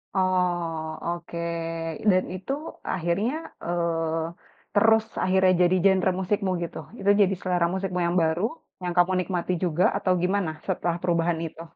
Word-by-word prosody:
Oh, 180 Hz, -3 st, +1 dB, 0.3 s
oke, 170 Hz, 0 st, -4 dB, 0.7 s
dan 185 Hz, 0 st, +3 dB
itu 185 Hz, +7 st, -5 dB, 0.4 s
akhirnya, 180 Hz, +6 st, 0 dB, 0.3 s
eee, 165 Hz, -1 st, -3 dB
terus 220 Hz, +1 st, +5 dB, 0.2 s
akhirnya 185 Hz, 0 st, +4 dB, 0.2 s
jadi 185 Hz, -, +2 dB
genre 190 Hz, -1 st, +4 dB
musikmu 195 Hz, +1 st, 0 dB
gitu? 170 Hz, -, -6 dB, 0.2 s
Itu 200 Hz, -, +1 dB
jadi 195 Hz, -1 st, +4 dB
selera 180 Hz, -2 st, +1 dB
musikmu 190 Hz, -1 st, -2 dB
yang 170 Hz, +1 st, 0 dB
baru, 160 Hz, +3 st, 0 dB, 0.4 s
yang 175 Hz, -1 st, -2 dB
kamu 175 Hz, +1 st, +5 dB
nikmati 180 Hz, -1 st, -1 dB
juga, 175 Hz, 0 st, +1 dB
atau 195 Hz, -2 st, 0 dB
gimana 185 Hz, -2 st, +1 dB
setelah 175 Hz, -2 st, -1 dB
perubahan 170 Hz, -2 st, +1 dB
itu? 160 Hz, 0 st, -8 dB
180 Hz, 140 wpm, -26 LUFS, 170-190 Hz, 0.7 s, terus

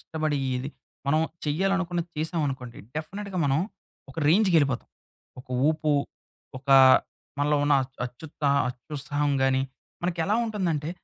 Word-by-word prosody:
కష్టపడి 155 Hz, -2 st, -2 dB, 0.2 s
ఏది 125 Hz, +3 st, -3 dB, 0.4 s
మనం 155 Hz, +3 st, +3 dB, 0.2 s
చేయాలనుకున్నది 175 Hz, +2 st, 0 dB
చేశామనుకోండి, 145 Hz, -7 st, -2 dB, 0.2 s
డెఫనిట్‌గా 195 Hz, +4 st, -4 dB
మనం, 140 Hz, +1 st, +2 dB, 0.5 s
ఒక -, -, -16 dB
రేంజ్‌కెళ్ళిపోతాం. 160 Hz, -, +3 dB, 0.5 s
ఒక -, -, -21 dB, 0.2 s
ఊపు, 155 Hz, -1 st, +1 dB, 0.7 s
ఒకా 135 Hz, 0 st, +5 dB, 0.6 s
మనలో 145 Hz, +1 st, +2 dB
ఉన్న 145 Hz, -1 st, +4 dB
అ -, -, -3 dB, 0.2 s
అత్యుత్సా 145 Hz, +3 st, -3 dB, 0.2 s
అత్యుత్సాహం 145 Hz, +3 st, -2 dB
గాని, 135 Hz, 0 st, +3 dB, 0.4 s
మనకెలా 180 Hz, +4 st, 0 dB
ఉంటుందంటే, 170 Hz, -9 st, -1 dB
150 Hz, 110 wpm, -26 LUFS, 140-170 Hz, 0.7 s, ఒకా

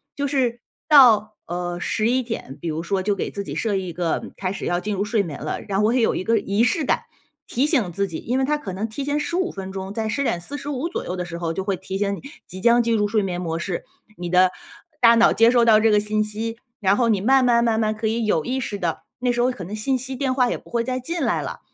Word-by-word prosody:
就 285 Hz, 0 st, -1 dB
是 250 Hz, -4 st, 0 dB, 0.3 s
到， 225 Hz, -8 st, +6 dB
呃， 175 Hz, 0 st, -3 dB
11 235 Hz, +7 st, +1 dB
点， 225 Hz, -, -6 dB
比 -, -, -4 dB
如 155 Hz, +1 st, -2 dB
说 190 Hz, +2 st, -1 dB
就 205 Hz, +1 st, +1 dB
给 -, -, -3 dB
自 200 Hz, -, -4 dB
己 -, -, -6 dB
设 215 Hz, -3 st, 0 dB
一 185 Hz, -2 st, -2 dB
个 170 Hz, -1 st, -2 dB
开 185 Hz, -2 st, -2 dB
始 -, -, -6 dB
要 175 Hz, 0 st, 0 dB
进 210 Hz, +2 st, -3 dB
入 195 Hz, -, 0 dB
睡 220 Hz, 0 st, +1 dB
眠 160 Hz, -6 st, -7 dB
了， 155 Hz, -, -3 dB
然 195 Hz, -2 st, -3 dB
后 -, -, +2 dB
我 225 Hz, -, +3 dB
也 255 Hz, -, +2 dB
有 225 Hz, -, +2 dB
一 -, -, -2 dB
个 225 Hz, +3 st, +2 dB
仪 200 Hz, +3 st, +1 dB
式 245 Hz, +7 st, +1 dB
感， -, -, +1 dB, 0.5 s
提 255 Hz, +4 st, +1 dB
醒 245 Hz, -, +1 dB
自 200 Hz, +4 st, -1 dB
己， 165 Hz, -4 st, -5 dB
因 250 Hz, +3 st, -2 dB
为 265 Hz, -, +2 dB
它 300 Hz, +2 st, +1 dB
可 220 Hz, -10 st, -6 dB
能 205 Hz, +4 st, -2 dB
提 225 Hz, +6 st, -5 dB
前 290 Hz, +1 st, 0 dB
15 355 Hz, +4 st, -1 dB
分 190 Hz, -1 st, -7 dB
钟 190 Hz, 0 st, -5 dB
在 220 Hz, 0 st, -2 dB
10:45 280 Hz, -, -2 dB
左 -, -, -4 dB
右 180 Hz, -, -3 dB
的 180 Hz, -, -3 dB
时 170 Hz, -1 st, -6 dB
候 170 Hz, -1 st, -2 dB
就 190 Hz, -, -3 dB
会 195 Hz, -1 st, 0 dB
提 190 Hz, +1 st, -5 dB
醒 200 Hz, 0 st, 0 dB
你 -, -, -10 dB, 0.3 s
即 185 Hz, +1 st, -9 dB
将 235 Hz, +2 st, +5 dB
进 230 Hz, 0 st, +1 dB
入 210 Hz, -1 st, +2 dB
睡 215 Hz, 0 st, +2 dB
眠 180 Hz, -2 st, -3 dB
模 165 Hz, -2 st, -2 dB
式， 175 Hz, 0 st, -3 dB, 0.3 s
你 175 Hz, 0 st, -5 dB
的 180 Hz, +1 st, +5 dB, 0.5 s
大 235 Hz, -1 st, +7 dB
脑 230 Hz, -, +5 dB
接 230 Hz, +1 st, +5 dB
收 240 Hz, -1 st, +4 dB
到 220 Hz, -2 st, +6 dB
这 225 Hz, 0 st, +4 dB
个 210 Hz, -, +5 dB
信 215 Hz, +1 st, 0 dB
息， 220 Hz, +2 st, -4 dB, 0.2 s
然 195 Hz, -2 st, +3 dB
后 240 Hz, -2 st, +2 dB
你 210 Hz, -3 st, +3 dB
慢 265 Hz, +5 st, +4 dB
慢 235 Hz, -1 st, +4 dB
慢 230 Hz, -2 st, +2 dB
慢 215 Hz, -1 st, +1 dB
可 220 Hz, +1 st, -2 dB
以 225 Hz, +1 st, 0 dB
有 165 Hz, -7 st, +1 dB
意 260 Hz, +1 st, -1 dB
识 210 Hz, -4 st, -4 dB
地 170 Hz, -3 st, -2 dB, 0.2 s
那 250 Hz, 0 st, +1 dB
时 240 Hz, -, 0 dB
候 250 Hz, +1 st, +3 dB
可 245 Hz, -7 st, -8 dB
能 200 Hz, +5 st, -6 dB
信 260 Hz, +5 st, 0 dB
息 260 Hz, +1 st, -6 dB
电 265 Hz, 0 st, 0 dB
话 250 Hz, -2 st, +2 dB
也 -, -, -1 dB
不 -, -, -18 dB
会 235 Hz, -, 0 dB
再 255 Hz, +1 st, -2 dB
进 335 Hz, +7 st, -4 dB
来 -, -, +1 dB
了， -, -, -6 dB
215 Hz, 290 characters per minute, -22 LUFS, 190-245 Hz, 0.5 s, 大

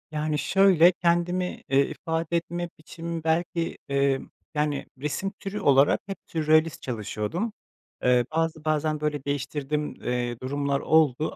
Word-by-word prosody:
Yani, 155 Hz, 0 st, -1 dB
şöyle, 185 Hz, -2 st, +5 dB
kendimi, 175 Hz, +1 st, +1 dB, 0.2 s
eee, 140 Hz, +1 st, +4 dB
ifade 165 Hz, 0 st, -2 dB
etme 175 Hz, +1 st, -4 dB
biçimim 165 Hz, +1 st, -6 dB
belki, 165 Hz, +1 st, 0 dB
eee, 140 Hz, -1 st, +2 dB, 0.3 s
yani, 150 Hz, -2 st, -1 dB
resim 150 Hz, +8 st, -2 dB
türü 200 Hz, +1 st, -4 dB
olarak 140 Hz, 0 st, +4 dB
hep 195 Hz, -2 st, -5 dB
sürrealist 155 Hz, 0 st, +2 dB
çalışıyordum. 120 Hz, -, -3 dB, 0.5 s
Eee, 125 Hz, -1 st, +4 dB
bazı, 160 Hz, -1 st, -1 dB
bazen, 155 Hz, 0 st, +1 dB
böyle, 150 Hz, -2 st, -1 dB
değiştirdiğim, 145 Hz, +1 st, -2 dB
eee, 120 Hz, -1 st, -1 dB
durumlar 140 Hz, +1 st, -1 dB
oldu 155 Hz, -2 st, +2 dB
155 Hz, 125 wpm, -26 LUFS, 140-170 Hz, 0.5 s, şöyle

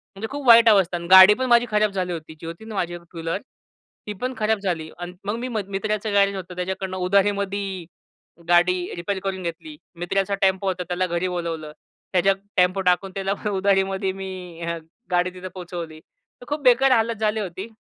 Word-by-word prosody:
म्हणजे 220 Hz, +3 st, -5 dB
खूप 285 Hz, -2 st, -5 dB
वाईट 230 Hz, -1 st, +8 dB
अवस्था. 190 Hz, -4 st, +3 dB
आणि 170 Hz, 0 st, -7 dB
गाडी 190 Hz, +2 st, +10 dB
पण 260 Hz, +4 st, -2 dB
माझी 240 Hz, -1 st, +4 dB
खराब 210 Hz, -1 st, +2 dB
झाली 180 Hz, -2 st, -2 dB
होती. 160 Hz, -1 st, -8 dB
जी -, -, -10 dB
होती 170 Hz, +6 st, -8 dB
ना 220 Hz, -1 st, -8 dB
माझ्याकड 175 Hz, -2 st, -3 dB
एक -, -, -26 dB
टू 170 Hz, -, -12 dB
व्हीलर 165 Hz, +4 st, -2 dB, 0.7 s
ती 210 Hz, -, -3 dB
पण 255 Hz, +1 st, -2 dB
खराब 215 Hz, -1 st, +1 dB
झाली 170 Hz, -5 st, -3 dB
आणि 175 Hz, 0 st, -6 dB
मग 205 Hz, +2 st, -1 dB
मी 250 Hz, -, -3 dB
मित्राचं 210 Hz, 0 st, -2 dB
गॅरेज 200 Hz, 0 st, +3 dB
होतं 185 Hz, -1 st, -7 dB
त्याच्याकडनं 185 Hz, +1 st, -4 dB
उधारीमध्ये 195 Hz, -1 st, 0 dB, 0.6 s
गाडी 175 Hz, +1 st, +5 dB, 0.2 s
रिपेअर 190 Hz, +3 st, -3 dB
करून 190 Hz, -1 st, -3 dB
घेतली. 170 Hz, -, -6 dB, 0.2 s
मित्राचा 195 Hz, +3 st, 0 dB
टेम्पो 190 Hz, 0 st, +2 dB
होता 185 Hz, -1 st, -1 dB
त्याला 180 Hz, +1 st, -1 dB
घरी 175 Hz, +1 st, -1 dB
बोलावलं. 165 Hz, -3 st, -4 dB, 0.4 s
त्याच्या 190 Hz, +2 st, +4 dB, 0.2 s
टेम्पो 185 Hz, +1 st, +3 dB
टाकून 180 Hz, +1 st, +1 dB
त्याला 195 Hz, 0 st, -1 dB, 0.2 s
उधारीमध्ये 195 Hz, 0 st, +1 dB
मी 195 Hz, 0 st, -6 dB, 0.8 s
गाडी 180 Hz, 0 st, +2 dB
तिथं 185 Hz, 0 st, -8 dB
पोहोचवली. 170 Hz, -3 st, -7 dB, 0.4 s
तर -, -, -11 dB
खूप 295 Hz, +1 st, -2 dB
बेकार 260 Hz, +2 st, +5 dB
हालत 230 Hz, -1 st, +2 dB
झाली 215 Hz, 0 st, +1 dB
होती. 190 Hz, 0 st, -5 dB
190 Hz, 185 wpm, -23 LUFS, 180-205 Hz, 0.8 s, गाडी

